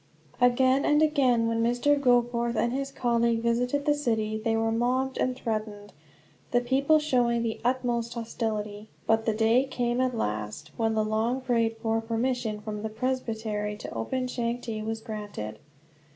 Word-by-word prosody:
Again 260 Hz, +2 st, +4 dB
and 295 Hz, -, +4 dB
again, 260 Hz, -7 st, +3 dB
when 230 Hz, 0 st, 0 dB
Mr. 245 Hz, +5 st, +3 dB
Goforth 240 Hz, -3 st, +2 dB
and 235 Hz, +2 st, +1 dB
his 275 Hz, +1 st, -2 dB
colleague 235 Hz, -2 st, +1 dB
visited 245 Hz, +5 st, +1 dB
the 295 Hz, -, +4 dB
city, 225 Hz, -7 st, -1 dB
they 225 Hz, 0 st, +1 dB
were 225 Hz, 0 st, +1 dB
mobbed 255 Hz, +3 st, 0 dB
and 255 Hz, 0 st, +1 dB
threatened, 215 Hz, -4 st, -4 dB, 0.6 s
the 245 Hz, -, +3 dB
people 270 Hz, +5 st, +3 dB
showing 245 Hz, -6 st, +1 dB
the 225 Hz, -1 st, -3 dB
utmost 240 Hz, -2 st, 0 dB
hostility. 215 Hz, -2 st, -4 dB, 0.2 s
But 225 Hz, 0 st, +2 dB
the 220 Hz, -, +2 dB
day 225 Hz, +3 st, +4 dB
came, 245 Hz, -2 st, -1 dB
at 255 Hz, -2 st, 0 dB
last, 105 Hz, -, -3 dB
when 225 Hz, -1 st, 0 dB
the 215 Hz, -1 st, +2 dB
long 220 Hz, +4 st, 0 dB
prayed 230 Hz, -3 st, 0 dB
for 225 Hz, 0 st, 0 dB
permission 225 Hz, -1 st, -1 dB
from 210 Hz, -1 st, -5 dB
the 220 Hz, -, -3 dB
presbytery 220 Hz, -3 st, -2 dB
to 210 Hz, -, -7 dB
open 255 Hz, -, -2 dB
Changte 235 Hz, -3 st, -3 dB
was 225 Hz, 0 st, -3 dB
granted. 205 Hz, -, -6 dB
235 Hz, 160 wpm, -27 LUFS, 220-250 Hz, 0.6 s, Again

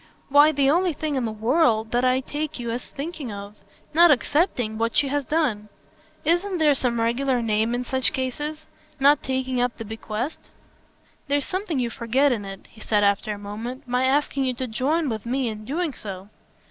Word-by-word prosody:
"Why 290 Hz, +2 st, +7 dB
the 280 Hz, -2 st, +2 dB
only 345 Hz, +4 st, +3 dB
thing 305 Hz, +1 st, -3 dB
in 260 Hz, -3 st, 0 dB
the 220 Hz, -, -2 dB
world 220 Hz, -1 st, +2 dB
that 245 Hz, +1 st, +1 dB
I 255 Hz, +1 st, +3 dB
take 300 Hz, +3 st, -4 dB
you 235 Hz, -2 st, -4 dB
as 240 Hz, +2 st, -4 dB
thinking 290 Hz, -4 st, -6 dB
of. 200 Hz, +1 st, -8 dB, 0.4 s
Not 340 Hz, +2 st, +7 dB
accepting 255 Hz, -, +1 dB
what 230 Hz, 0 st, 0 dB
she 290 Hz, -2 st, +3 dB
has 285 Hz, 0 st, -1 dB
done. 240 Hz, -10 st, 0 dB, 0.6 s
Isn't 350 Hz, +4 st, +1 dB
there 305 Hz, -3 st, +4 dB
some 245 Hz, -3 st, 0 dB
regular 245 Hz, +3 st, +1 dB
name 220 Hz, +1 st, +1 dB
in 245 Hz, -, -2 dB
such 260 Hz, +1 st, +1 dB
cases? 295 Hz, +4 st, -4 dB, 0.3 s
Not 285 Hz, +1 st, +5 dB
taking 260 Hz, -1 st, -1 dB
up 245 Hz, -1 st, -1 dB
the 225 Hz, -, -6 dB
bequest." 220 Hz, +5 st, -5 dB, 0.8 s
"There's 285 Hz, 0 st, +1 dB
something 375 Hz, -5 st, -2 dB
you 240 Hz, -2 st, -1 dB
forget 260 Hz, +4 st, +2 dB
in 215 Hz, -5 st, -2 dB
it," 195 Hz, -1 st, -8 dB
he 220 Hz, -, -17 dB
said 210 Hz, -2 st, +2 dB
after 200 Hz, +1 st, +2 dB
a 205 Hz, -, -4 dB
moment. 220 Hz, +6 st, -7 dB
"My 250 Hz, +1 st, +1 dB
asking 275 Hz, 0 st, +1 dB
you 255 Hz, -1 st, -1 dB
to 260 Hz, -, -3 dB
join 285 Hz, +8 st, 0 dB
with 220 Hz, -5 st, -3 dB
me 255 Hz, 0 st, 0 dB
in 215 Hz, -1 st, -7 dB
doing 310 Hz, +3 st, -2 dB
so." 195 Hz, -3 st, -7 dB
255 Hz, 195 wpm, -24 LUFS, 225-290 Hz, 0.8 s, Why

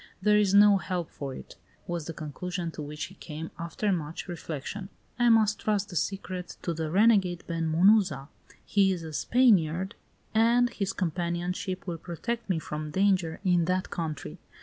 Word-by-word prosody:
There 210 Hz, 0 st, +4 dB
is 200 Hz, -1 st, +3 dB
no 205 Hz, 0 st, +7 dB
help 180 Hz, -2 st, -3 dB
for 135 Hz, -2 st, -6 dB
it," -, -, -11 dB, 0.3 s
was 170 Hz, -3 st, -3 dB
the -, -, -3 dB
conclusion 170 Hz, +3 st, -4 dB
to 155 Hz, -, -7 dB
which 150 Hz, +1 st, -5 dB
he 190 Hz, -, -7 dB
came, 160 Hz, -3 st, -7 dB
after 170 Hz, +5 st, -1 dB
much 165 Hz, -2 st, -3 dB
reflection. 175 Hz, +3 st, -6 dB, 0.3 s
"I 240 Hz, 0 st, +5 dB
must 215 Hz, -2 st, +4 dB
trust 210 Hz, -3 st, 0 dB
the 175 Hz, -, -8 dB
secret 185 Hz, +1 st, -3 dB
to 170 Hz, -, -1 dB
the 160 Hz, -1 st, -3 dB
renegade 190 Hz, -2 st, +3 dB
Ben 165 Hz, -1 st, -2 dB
Munuza. 175 Hz, -5 st, +4 dB, 0.4 s
He 195 Hz, -2 st, +3 dB
is 175 Hz, -3 st, -3 dB
a 160 Hz, -1 st, -7 dB
Spaniard, 190 Hz, -, +3 dB, 0.4 s
and 235 Hz, +2 st, +4 dB
his 195 Hz, -2 st, -2 dB
companionship 180 Hz, +2 st, -2 dB
will 170 Hz, -3 st, -4 dB
protect 230 Hz, +8 st, -4 dB
me 185 Hz, -, +2 dB
from 155 Hz, -1 st, -5 dB
danger 185 Hz, -1 st, +1 dB
in 175 Hz, -3 st, +3 dB
that 185 Hz, +1 st, -1 dB
country. 155 Hz, -, -4 dB
180 Hz, 170 wpm, -28 LUFS, 165-200 Hz, 0.4 s, no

